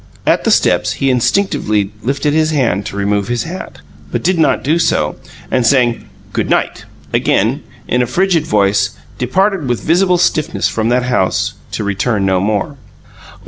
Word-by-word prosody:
At - - +2
the - - +3
steps, - - +2
he 135 -1 0
instinctively 115 - 0
lifted 140 +4 -1
his 155 0 +2
hand 120 - 0
to - - -7
remove 100 0 0
his 120 -1 -1
hat, 175 +3 -8 0.3
but - - -2
did 180 -1 +1
not 160 - +2
do 155 +5 +1
so, 75 - +1 0.4
and, 125 - +2
saying 120 -1 +2 0.2
"Goodnight," - - -1 0.3
again - - +1 0.3
in 125 - +1
a 125 - 0
frigid 175 +3 +1
voice, 100 -1 +1 0.2
departed 185 +4 0
with 120 - -1
visible 180 +2 +3
stiffness 170 -3 +1
from 110 0 -1
that 125 +1 +2
house, 125 -7 0 0.2
to - - -2
return 100 +1 0
no 95 -1 +2
more. 105 +8 -1
125 Hz, 160 wpm, -15 LUFS, 105-160 Hz, 0.4 s, the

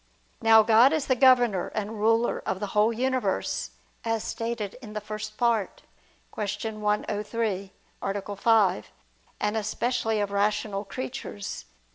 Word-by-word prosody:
Now 225 -1 +7
God 230 +6 +6
is 310 -3 0
the 260 - +2
governor 245 -7 +4
and 215 0 -3
ruler 225 +2 +2
of 190 - -2
the 205 - -2
whole 210 +2 +4
universe, 255 +2 -1 0.3
as 225 -1 -1
stated 230 -3 -3
in 215 -4 -9
the 215 - -2
First 215 0 -7
Part 235 -5 0 0.5
(Q. 210 +1 -3
103, 210 -1 -1 0.3
A. 200 +1 -3
5): 200 -3 +2 0.5
and 210 +1 0
especially 225 +1 -1
of 205 -1 -1
rational 205 0 0
creatures. 250 -5 -6
215 Hz, 130 wpm, -26 LUFS, 205-230 Hz, 0.5 s, Now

